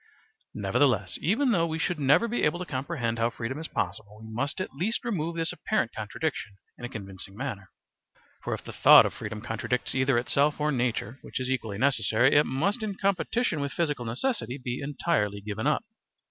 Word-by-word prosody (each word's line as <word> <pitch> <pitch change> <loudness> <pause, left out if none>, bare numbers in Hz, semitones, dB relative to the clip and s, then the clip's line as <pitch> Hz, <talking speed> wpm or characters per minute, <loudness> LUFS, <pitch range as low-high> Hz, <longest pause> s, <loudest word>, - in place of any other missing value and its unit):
Nevertheless, - - +1
even 255 +4 +2
though 170 -6 +2
we 160 0 -2
should 170 0 -1
never 145 - +4
be 240 +2 -1
able 150 +3 +2
to 180 - -5
comprehend 130 -5 -2
how 115 +1 +3
freedom 120 +4 -5
is 160 - -5
possible, 105 0 -4
we 110 0 -10
must 140 +9 -2
at 185 - -4
least 195 - -2
remove 170 -7 -1
this 165 -1 -1
apparent 215 - -1
contradiction 110 +1 -3 0.3
in 120 - -5
a - - -5
convincing 95 -2 -8
manner. 110 -8 -5 0.7
For - - -1
if - - -11
the - - -8
thought - - +8
of - - -2
freedom 105 0 -6
contradicts 115 +2 -2
either 130 -1 +2
itself 140 +5 +2
or 150 0 +1
nature, 120 -2 -1
which - - -5
is 130 0 -2
equally 110 -6 -2
necessary, 125 0 +3
it 145 +1 +5
must 185 - 0
in 210 -2 -3
competition 195 0 0
with 140 0 -3
physical 150 -7 -1
necessity 130 - -2
be 125 -1 -4
entirely 140 -7 0
given 105 +5 -3
up. 150 - +2
135 Hz, 190 wpm, -28 LUFS, 115-165 Hz, 0.7 s, thought